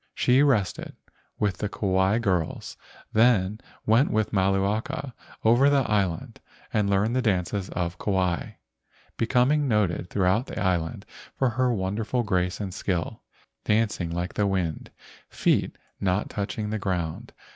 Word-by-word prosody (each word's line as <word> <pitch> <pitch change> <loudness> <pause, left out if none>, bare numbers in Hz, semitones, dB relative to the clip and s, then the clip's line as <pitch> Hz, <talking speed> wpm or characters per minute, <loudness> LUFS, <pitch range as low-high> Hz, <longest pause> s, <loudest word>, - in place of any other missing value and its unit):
She 125 +2 +4
rested, 125 -10 +1 0.4
with 105 -3 0
the 105 - -2
Kauai 95 0 +1
girls, 90 -8 -1 0.4
then 110 -3 +3 0.3
went 115 +6 +4
with 110 0 0
Malu 95 0 +2
aka 130 +7 -3 0.3
over 120 +5 +5
the 140 -3 +2
island 95 -6 -1 0.3
and 105 -2 +1
learned 100 +4 +1
the 130 - +2
dances 100 -3 -1
of 85 0 -3
Kauai, 95 -4 -1 0.6
becoming 125 +6 +2
noted 100 -6 0
throughout 100 +5 +1
the - - -5
island 85 -4 -1 0.3
for 130 - +2
her 125 +2 +1
wonderful 110 +4 -1
grace 90 -4 0
and 100 -3 -4
skill, 90 -3 -3 0.4
dancing 105 -5 +1
like 85 +2 -3
the 105 - +1
wind, 90 -5 -2 0.4
feet - - +1 0.2
not 95 +1 0
touching 105 +1 -3
the 110 - -2
ground. 90 -5 -3
100 Hz, 135 wpm, -26 LUFS, 95-115 Hz, 0.6 s, over